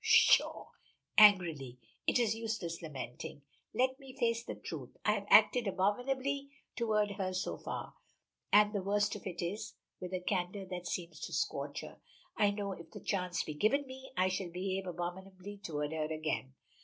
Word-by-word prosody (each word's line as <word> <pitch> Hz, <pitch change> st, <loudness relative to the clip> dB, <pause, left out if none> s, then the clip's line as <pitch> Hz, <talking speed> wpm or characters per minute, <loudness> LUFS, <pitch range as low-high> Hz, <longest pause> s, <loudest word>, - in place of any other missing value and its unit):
Pshaw!" -, -, +5 dB, 0.5 s
angrily, 170 Hz, -, +6 dB, 0.3 s
"it -, -, +4 dB
is 230 Hz, -3 st, +3 dB
useless 215 Hz, -7 st, -3 dB
lamenting. 140 Hz, -3 st, -7 dB, 0.3 s
Let 260 Hz, +3 st, +1 dB
me 270 Hz, -1 st, -12 dB
face 230 Hz, 0 st, +1 dB
the -, -, -5 dB
truth. -, -, -7 dB
I -, -, +5 dB
have -, -, -2 dB
acted 245 Hz, -3 st, +6 dB
abominably 260 Hz, +9 st, 0 dB, 0.3 s
toward 215 Hz, -3 st, +1 dB
her 185 Hz, -1 st, -1 dB
so 185 Hz, -, -1 dB
far, -, -, -5 dB, 0.6 s
and 210 Hz, +1 st, +6 dB
the 200 Hz, -, 0 dB
worst 205 Hz, +2 st, +1 dB
of 205 Hz, -, -7 dB
it 175 Hz, -1 st, -4 dB
is" 190 Hz, +5 st, -4 dB, 0.2 s
with 180 Hz, 0 st, -6 dB
a -, -, -1 dB
candor 185 Hz, +1 st, -2 dB
that 180 Hz, -1 st, -5 dB
seems 170 Hz, -4 st, -4 dB
to 170 Hz, -, -6 dB
scorch 145 Hz, -1 st, -1 dB
her -, -, -10 dB, 0.4 s
"I 205 Hz, -2 st, +4 dB
know 200 Hz, -1 st, -2 dB
if 170 Hz, -3 st, -8 dB
the -, -, -9 dB
chance 180 Hz, -3 st, -1 dB
be 155 Hz, -, -5 dB
given 220 Hz, -, +2 dB
me, 265 Hz, 0 st, -10 dB
I 185 Hz, +1 st, +4 dB
shall 185 Hz, -1 st, -2 dB
behave 190 Hz, +2 st, -3 dB
abominably 185 Hz, +3 st, -6 dB
toward 150 Hz, -5 st, -3 dB
her 155 Hz, -1 st, -2 dB
again. 155 Hz, -4 st, -2 dB
190 Hz, 170 wpm, -34 LUFS, 170-215 Hz, 0.6 s, angrily